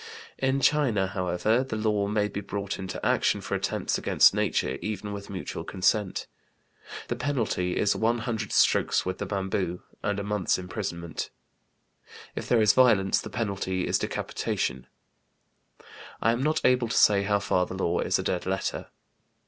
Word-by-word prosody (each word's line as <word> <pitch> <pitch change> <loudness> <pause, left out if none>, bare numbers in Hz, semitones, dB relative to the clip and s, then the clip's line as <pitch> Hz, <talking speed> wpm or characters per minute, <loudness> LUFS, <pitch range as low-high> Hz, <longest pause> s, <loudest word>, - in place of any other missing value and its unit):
In 135 +1 +1
China, 130 -10 +3
however, 95 +5 0
the 130 -4 -5
law 105 -2 0
may 105 0 +1
be 100 - -5
brought 100 0 -4
into 95 -1 -5
action - - +2
for - - -6
attempts - - -1
against - - +5
nature 65 - 0
even 105 -1 -4
with 100 0 -7
mutual 95 -2 -5
consent; 95 +1 0 0.8
the 120 - -2
penalty 120 -9 -1
is 105 - +2
one 115 +2 +1
hundred 115 -3 -3
strokes - - +3
with 95 0 -3
the 100 - -3
bamboo 95 -3 -2 0.2
and 105 -1 -1
a - - -3
month's 105 -2 0
imprisonment; 90 -3 -5 1.1
if - - -5
there 115 -3 +4
is 105 - +5
violence, 110 -7 +4
the - - -7
penalty 100 -4 -2
is - - +1
decapitation; 65 - -2 1.3
I 115 - +3
am 120 +2 -1
not 155 +3 0
able 125 -2 +4
to 115 - -1
say 100 -1 +5
how 100 +1 +2
far 90 -2 0
the - - -6
law 90 -2 0
is - - +1
a - - -3
dead 90 0 -2
letter. 95 0 -2
100 Hz, 165 wpm, -27 LUFS, 95-115 Hz, 1.3 s, against